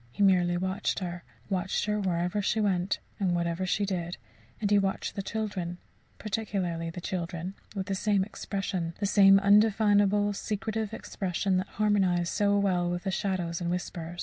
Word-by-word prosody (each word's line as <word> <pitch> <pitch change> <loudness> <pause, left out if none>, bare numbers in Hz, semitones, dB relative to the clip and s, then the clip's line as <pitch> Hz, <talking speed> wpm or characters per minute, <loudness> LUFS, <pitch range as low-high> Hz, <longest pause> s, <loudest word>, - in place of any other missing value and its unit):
He 205 - 0
merely 180 -2 +4
watched 190 +3 -1
her 175 -2 -4 0.2
watched 190 +1 -1
her 210 0 0
wherever 180 +1 0
she 215 +2 0
went, 190 -2 +1 0.2
and 185 -3 +1
whatever 170 +2 -1
she 180 +4 +1
did; 175 -3 -3 0.4
and 205 -2 -1
he 205 - +6
watched 195 -1 -1
the 200 - -3
children 195 -5 -3 0.4
particularly 195 -6 -2
the 165 - -7
children 175 0 -4 0.2
with 190 -1 -2
the 195 - -2
same 200 0 +2
expression, 190 -4 -3
the 205 - 0
same 195 -1 +7
undefinable 205 0 +4
secretive 215 +1 -3
expression 190 -3 -1
that 185 +1 -1
harmonized 190 -5 +1
so 205 0 +2
well 180 -3 +1
with 175 0 -3
the 190 - -1
shadows 185 -4 -2
and 170 - -1
whispers. 175 -1 -4
190 Hz, 165 wpm, -29 LUFS, 175-205 Hz, 0.4 s, same